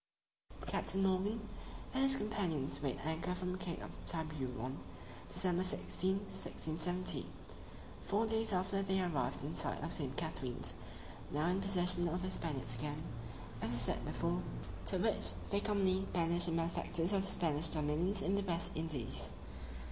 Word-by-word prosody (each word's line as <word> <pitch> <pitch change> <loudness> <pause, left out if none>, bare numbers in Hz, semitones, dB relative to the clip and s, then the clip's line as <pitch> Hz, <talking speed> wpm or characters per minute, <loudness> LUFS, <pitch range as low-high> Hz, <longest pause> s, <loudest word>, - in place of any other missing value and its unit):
_ - - -7
CAPTAIN 195 0 +1
MORGAN 200 +3 +2 0.5
and 265 - +2
his 270 0 +7
companions 175 - 0
weighed 135 -3 -1
anchor 160 +3 -1
from 180 0 -2
the 185 - -3
Cape 175 -2 -3
of - - -6 0.2
Tiburon, 135 -5 -2 0.5
December 180 -1 +1
16, 185 0 0
1670. 175 -2 -2 0.7
Four 210 +3 +2
days 225 0 +2
after 190 +1 +1
they 190 0 +2
arrived 170 -8 0
in - - -3
sight - - -1
of - - -1
St. - - -1
Catherine's, - - -2 0.6
now 150 +2 +1
in 185 +2 +2
possession 180 -2 +2
of 180 +2 -1
the 185 - 0
Spaniards 135 -10 -2
again, 150 +5 -3 0.6
as - - 0
was 120 0 +6
said 115 - +2
before, - - 0 0.4
to - - +2
which 85 0 +2 0.2
they 200 - +4
commonly 195 -3 +3
banish 170 0 +3
the 170 - 0
malefactors 165 +2 +1
of 195 - +4
the 195 - -2
Spanish 160 -1 +3
dominions 160 +6 +2
in 195 - +2
the 200 - +3
West 175 -3 -1
Indies. 155 -7 -2
175 Hz, 155 wpm, -37 LUFS, 155-195 Hz, 0.7 s, his